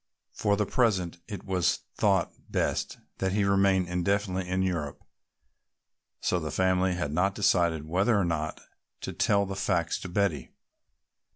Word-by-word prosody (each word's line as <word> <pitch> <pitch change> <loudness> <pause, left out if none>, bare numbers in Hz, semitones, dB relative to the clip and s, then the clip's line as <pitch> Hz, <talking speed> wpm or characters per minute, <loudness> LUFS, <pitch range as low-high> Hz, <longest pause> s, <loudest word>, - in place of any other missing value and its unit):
For 100 -1 +1
the 105 - +1
present 95 -8 +1
it 100 -3 -6
was 90 -2 +1
thought - - +2 0.2
best - - -1 0.2
that 95 -1 0
he 105 0 +2
remain 100 -1 +3
indefinitely 95 +1 -1
in 95 +1 +1
Europe, 80 -6 -3 1.2
so 90 - 0
the 80 -2 -4
family 95 +3 +2
had 85 -5 -2
not 95 +4 +1
decided 85 -6 +2
whether 95 +7 +2
or 95 - +2
not 80 -2 -2 0.4
to - - -5
tell 100 0 +2
the 95 0 -5
facts 85 -4 0
to 95 - -7
Betty. 90 -7 0
95 Hz, 150 wpm, -28 LUFS, 85-100 Hz, 1.2 s, remain